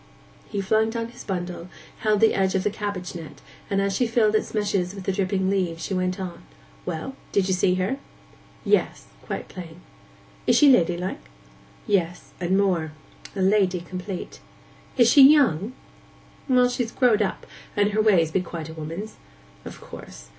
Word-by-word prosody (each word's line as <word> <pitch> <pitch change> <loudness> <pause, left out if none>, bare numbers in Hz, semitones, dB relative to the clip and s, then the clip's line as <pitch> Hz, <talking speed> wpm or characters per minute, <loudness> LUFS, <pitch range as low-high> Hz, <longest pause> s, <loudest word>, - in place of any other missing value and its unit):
He 205 -2 -2
flung 220 +3 +2
down 230 0 -3
his 240 +1 -12
bundle, 175 -2 -4 0.3
held 215 -1 +1
the 225 - +5
edge 190 -1 +1
of 190 - +1
the 210 - +1
cabbage 200 -4 -4
net, 160 -4 -9 0.3
and 195 - +1
as 195 -1 0
she 245 +3 +1
filled 225 -2 +2
its 215 - 0
meshes 200 -3 -1
with 195 - -7
the 195 - 0
dripping 190 0 0
leaves 180 -4 -1
she - - -3
went 185 0 -1
on, 185 -2 -6 0.5
'Well, 165 +12 -4 0.2
did 195 -2 +2
you 190 - +1
see 180 0 +2
her?' 190 +9 -1 0.7
'Yes; - - +1 0.2
quite - - -5
plain.' 175 -2 -10 0.7
'Is - - +5
she 290 -2 +7
ladylike?' 175 -4 +1 0.6
'Yes; 180 -3 -1
and 180 +2 +1
more. 175 -6 +1 0.4
A 190 - 0
lady 190 -2 +3
complete.' 180 +2 -7 0.6
'Is 240 -3 +6
she 275 +4 +7
young?' 255 - +5 0.8
'Well, 250 -1 +5
she's 245 -2 -2
growed 240 -5 +3
up, 200 - -2 0.3
and 205 0 +3
her 215 +1 +2
ways 180 -7 +3
be 185 - +1
quite 170 -3 -7
a - - -8
woman's.' 165 +7 -7 0.5
'Of - - -9
course. - - -11
195 Hz, 170 wpm, -24 LUFS, 180-215 Hz, 0.8 s, she